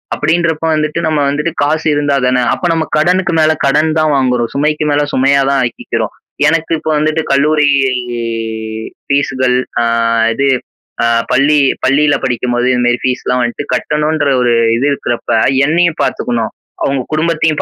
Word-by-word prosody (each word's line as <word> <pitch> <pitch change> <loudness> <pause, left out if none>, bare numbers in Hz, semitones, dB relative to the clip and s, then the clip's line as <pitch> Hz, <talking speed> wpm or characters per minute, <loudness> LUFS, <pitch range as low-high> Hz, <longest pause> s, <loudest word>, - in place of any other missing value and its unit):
அப்பிடின்றப்ப 165 0 0
வந்துட்டு 155 +1 -1
நம்ம 155 -1 0
வந்துட்டு 150 +4 -1
காசு 155 +2 -1
இருந்தா 145 -1 0
தானே? 125 0 +2
அப்ப - - -4
நம்ம 160 -1 -1
கடனுக்கு 175 +2 +1
மேல 155 0 +4
கடன் 150 +3 +2
தான் 155 -1 +2
வாங்குறோம், 125 -3 0
சுமைக்கு 150 +2 0
மேல 145 0 +2
சுமையா 140 +1 +3
தான் 135 -1 +1
ஆக்கிக்கிறோம். 120 - -4 0.3
எனக்கு 165 +1 0
இப்ப 160 - -4
வந்துட்டு 155 +1 0
கல்லூரி 150 +2 +2 1.4
ஃபீஸ்கள், 130 -3 +1 0.2
அ - - +1 0.5
இது 140 - 0 0.6
அ - - +3 0.3
பள்ளி 145 +3 +3 0.3
பள்ளியில 145 +2 +3
படிக்கும் 125 -1 -1
போது 120 +1 +1
இந்தமாரி 120 0 +1
ஃபீஸ்லாம் 125 0 -1
வந்துட்டு 120 +4 -3
கட்டணுன்ற 150 +2 0
ஒரு 120 -1 +2 0.2
இது 130 - 0
இருக்குறப்ப 120 -3 -2 0.3
என்னையும் 170 +1 +1
பாத்துக்கணும், 115 -2 -2 0.3
அவுங்க 135 -1 0
குடும்பத்தையும் 155 -1 0
145 Hz, 145 wpm, -14 LUFS, 130-155 Hz, 1.4 s, மேல